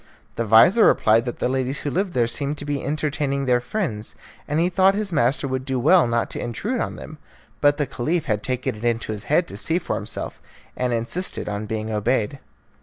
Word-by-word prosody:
The 115 - -1
vizir 120 - +7
replied 110 +2 +4
that 120 - -4
the - - 0
ladies 130 +1 -1
who 145 - -3
lived 185 +2 -1
there 120 -2 +2
seemed 140 +5 -2
to 145 - -5
be 145 -1 -2
entertaining 145 -1 -1
their 125 -1 +3
friends, 125 - -3 0.3
and 150 +2 0
he 170 - +3
thought 190 +2 +3
his 205 -3 -2
master 135 0 +1
would 130 -1 -2
do 130 -1 -2
well 160 +3 +5
not 115 0 0
to - - -3
intrude 210 - -2
on - - -3
them; 155 - -10 0.4
but 145 0 +4
the 145 - 0
Caliph 155 +7 -2
had 105 -2 0
taken 130 +1 -2
it 105 +1 -11
into 115 -2 0
his 105 -1 -6
head 170 +4 +2
to - - -8
see 165 0 0
for - - -2
himself, - - -4 0.3
and 125 -1 -1
insisted 120 +11 -2
on 105 +1 -4
being 110 0 -3
obeyed. 115 +4 0
135 Hz, 215 wpm, -23 LUFS, 115-155 Hz, 0.4 s, vizir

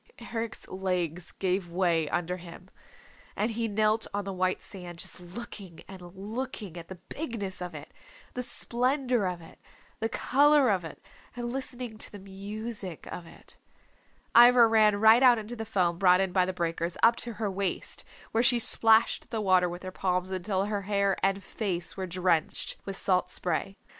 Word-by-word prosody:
Eric's 225 -1 -4
legs 180 -3 -2
gave 185 -1 -1
way 170 -3 +1
under 175 +1 -1
him, 180 +1 -12 0.6
and 215 +3 0
he 230 0 -1
knelt 215 +1 +1
on 205 -1 -2
the 195 - -4
white 185 0 0
sand, 180 -3 -9
just 170 - -4
looking 185 -1 -9
and 190 -1 -10
looking 210 -2 -5
at 170 -1 -8
the 190 - -8
bigness 220 - -5
of 180 -2 -5
it, 150 +1 -10 0.4
the 250 - -3
splendor 250 -2 0
of 180 -1 -4
it, - - -15 0.4
the 225 - -1
color 285 -1 +4
of 185 -3 0
it, 160 - -10 0.3
and 240 0 -4
listening 250 -4 -5
to - - -3
the 205 - -9
music 200 -1 -6
of 170 - -7
it. - - -14 0.8
Ivra 240 0 +8
ran 215 -2 +5
right 220 +3 +7
out 250 -2 +7
into 220 +2 -5
the 225 -1 -5
foam 180 -5 0
brought 180 -1 +6
in 190 -1 0
by 180 0 +3
the - - 0
breakers, 170 -1 -2
up 230 +1 +7
to 235 - -4
her 210 -2 -2
waist, 195 -1 -2 0.3
where 225 - +2
she 245 0 +4
splashed 225 -1 +3
the 225 - -2
water 185 -3 +3
with 175 +2 -7
her 185 - -5
palms 185 0 -1
until 190 +1 -1
her 205 -1 -2
hair 200 -1 +1
and 195 0 +1
face 185 -6 -3
were 190 -1 -4
drenched 175 -2 0
with 195 -1 -4
salt 180 -1 +2
spray. 185 +3 -2
195 Hz, 180 wpm, -28 LUFS, 180-225 Hz, 0.8 s, Ivra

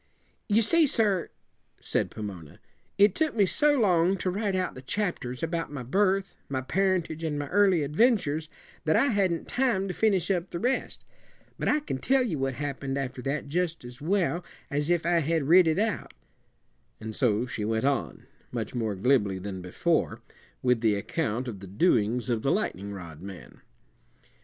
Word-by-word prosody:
"You 215 +2 +4
see, 320 +8 +4
sir," 205 -8 +1 0.5
said - - -1
Pomona, 95 -8 -8 0.4
"it 200 -1 +6
took 315 -4 0
me 205 -3 +4
so 290 +8 +3
long 185 -3 +3
to 185 - -1
write 200 0 -1
out 185 -1 -1
the 130 - -10
chapters 135 -6 -3
about 165 -1 -2
my 140 -4 -5
birth, 195 - +1 0.2
my 130 -1 -1
parentage, 175 0 0
and 155 -2 -1
my 145 0 -3
early 190 -5 +4
adventures, 155 - +2 0.4
that 155 0 +3
I 280 - +4
hadn't 190 -7 0
time 240 -7 +1
to 185 - -3
finish 200 -4 +2
up 180 -1 -1
the - - -4
rest. 250 +8 -1 0.5
But - - -1
I 300 - +3
can 135 - -4
tell 265 - +3
you 175 - -2
what 135 -1 -1
happened 140 0 -3
after 130 -2 -4
that 140 +3 -2
jus' 165 +2 -1
as 120 +2 -11
well 180 +1 0 0.3
as 145 +2 0
if 175 -2 +2
I 170 0 +3
had 160 0 0
writ 170 +4 +6
it 160 - +2
out." 215 +1 -1 0.8
And 110 0 -6
so 115 -2 +2
she 115 -3 -4
went 110 +3 0
on, 140 -3 -1 0.3
much - - -4
more 110 -4 -1
glibly 100 -2 +2
than 95 0 -6
before, 90 0 0 0.4
with 125 -3 +2
the 110 -3 +3
account 125 +2 -2
of 105 -5 -6
the 100 - -10
doings 110 - +1
of 115 -3 0
the 135 - +1
lightning 100 - -2
rod 85 -5 -9
man. 95 -1 -10
155 Hz, 180 wpm, -27 LUFS, 125-195 Hz, 0.8 s, it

